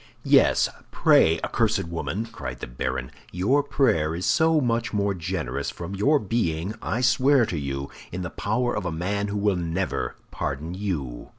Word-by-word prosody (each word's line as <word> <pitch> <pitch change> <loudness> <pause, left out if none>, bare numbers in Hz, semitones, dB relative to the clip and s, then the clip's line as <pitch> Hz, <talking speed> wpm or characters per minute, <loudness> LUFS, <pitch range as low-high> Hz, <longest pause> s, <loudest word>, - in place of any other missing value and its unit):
"Yes, - - +5 0.2
pray, 80 0 +4
accursed - - +1
woman!" 85 +6 -3
cried 115 0 -7
the - - -5
baron; 65 +1 -4 0.2
"your 105 +11 +2
prayer 85 - +1
is 90 +3 -3
so 160 -1 +4
much 115 -3 0
the - - -6
more 100 -1 +1
generous 80 -7 -3
from 85 +3 -7
your 135 +10 +3
being, 100 - -1
I 120 - -1
swear 130 +1 +4
to 85 -7 -3
you, 70 0 -4 0.2
in 90 +1 -4
the 90 - -5
power 120 +4 -1
of 95 -3 -2
a - - -2
man 100 +5 -1
who 100 0 -3
will 100 -1 +2
never 85 +2 -2 0.2
pardon 75 +5 -3
you!" 80 -12 -4
95 Hz, 175 wpm, -25 LUFS, 80-115 Hz, 0.2 s, Yes